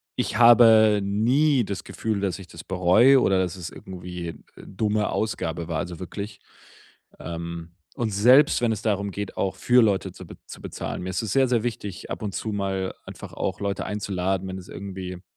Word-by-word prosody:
ich - - -2
habe 115 -3 +7
nie 125 +6 +2
das 100 -1 -5
Gefühl, 110 -3 -3
dass 100 -1 -2
ich 95 - -11
das 85 -2 -11
bereue 95 +9 +5
oder 95 -1 +3
dass 95 0 -2
es 85 -2 -6
irgendwie, 90 -2 -8
äh, - - -7 0.3
dumme 105 +1 -1
Ausgabe 85 -6 -2
war, 80 -2 -2
also, 90 -3 -5
wirklich. 100 +3 -7 0.8
Ähm, 85 0 -6 0.2
und 115 -3 -2
selbst, 125 +10 +5
wenn 120 -2 +2
es 110 0 -3
darum 100 -2 -1
geht, 100 0 -5
auch 95 - -1
für 125 -1 +4
Leute 100 -3 +1
zu 95 - -11
be - - -12
zu - - -11
bezahlen. - - -5
Mir 95 - -4
ist 90 - -1
es 105 - -3
sehr, 135 -1 +4
sehr 120 -3 +1
wichtig, 105 -5 -5
ab - - -5
und 100 -3 -3
zu 110 - -3
mal 95 -2 -2
einfach - - -10
auch 95 +2 -3
Leute 100 0 -2
einzuladen, 95 -2 -2
wenn 95 0 -5
es 90 - -13
irgendwie 95 -2 -7
100 Hz, 195 wpm, -24 LUFS, 90-110 Hz, 0.8 s, habe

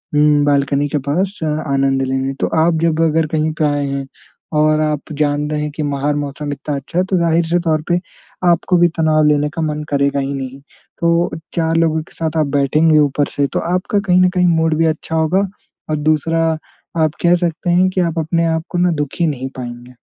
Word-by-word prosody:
हुँ, 150 0 +4
balcony 140 0 +1
के 150 - -1
पास 190 +7 0
अ, - - 0 0.3
आनंद 135 0 +1
लेने। 135 +1 -1
तो - - +2 0.2
आप 165 -1 +1
जब 165 -1 +1
अगर 160 0 +2
कहीं 155 +1 0
पे 155 - +3
आएँ 145 -1 0
हैं 135 0 -3 0.6
और 155 0 +3
आप 150 -1 -2
जान 145 0 0
रहे 150 0 -1
हैं 150 0 -3
कि 155 - -2
बाहर 145 0 -1
मौसम 145 0 -4
इतना 145 +1 -4
अच्छा 140 +5 -6
है 185 - +2
तो 190 - +2
ज़ाहिर 170 0 +2
से 175 +2 +2
तौर 155 -1 +2
पे 175 0 +2 0.5
आपको 175 +1 +2
भी 175 0 +5
तनाव 155 -1 +3
लेने 150 0 +2
का 165 - -2
मन 150 -1 -2
करेगा 140 0 +1
ही 135 0 -2
नहीं। 135 -1 -6 0.4
तो 170 +1 +2 0.3
चार 165 -1 +1
लोगों 160 -1 +2
के - - -22
साथ 160 -1 -2
आप 155 - +1
बैठेंगे 155 +3 +3
ऊपर 145 0 +2
से 140 -1 +1
तो - - +1
आपका 185 +3 0
कहीं 185 -2 +2
न 185 - +5
कहीं 180 0 +1
मूड 160 -2 +2
भी 165 - +3
अच्छा 160 +1 -3
होगा 170 +5 +2 0.4
और 155 - 0
दूसरा 165 +2 +1 0.6
आप 155 - +2
कह 175 0 +5
सकते 175 -1 -2
हैं 180 +2 +4
कि 185 - 0
आप 170 -1 -1
अपने 165 +1 0
आप 160 0 0
को - - -3
ना 180 0 +3
दुखी 155 +4 -1
नहीं 135 -3 -3
पाएँगे। 120 0 -8
155 Hz, 220 wpm, -17 LUFS, 145-165 Hz, 0.6 s, भी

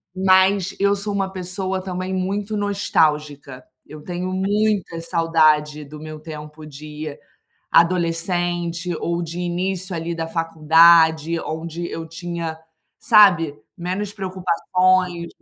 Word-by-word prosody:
Mas, 190 0 +3
eu 200 0 +3
sou 205 +1 -4
uma 195 -1 -1
pessoa 185 0 -4
também 185 0 -4
muito 200 +3 -2
nostálgica. 150 -9 0 0.2
Eu 155 - -11
tenho 180 +3 -4
muita 195 -2 0
saudade 155 -3 +2
do 150 +1 -11
meu 155 0 -8
tempo 155 0 -10
de 150 0 -8 0.5
adolescente 175 0 +1
ou 170 0 -2
de 170 +1 -6
início, 180 +1 -3
ali, 165 +1 -3
da 165 -1 -4
faculdade, 165 0 +4
onde 165 +2 -5
eu 165 0 -6
tinha, 165 -1 -5 0.4
sabe? 185 - +5 0.2
Menos 190 +3 -4
preocupações 185 -1 0
170 Hz, 115 wpm, -21 LUFS, 160-185 Hz, 0.5 s, sabe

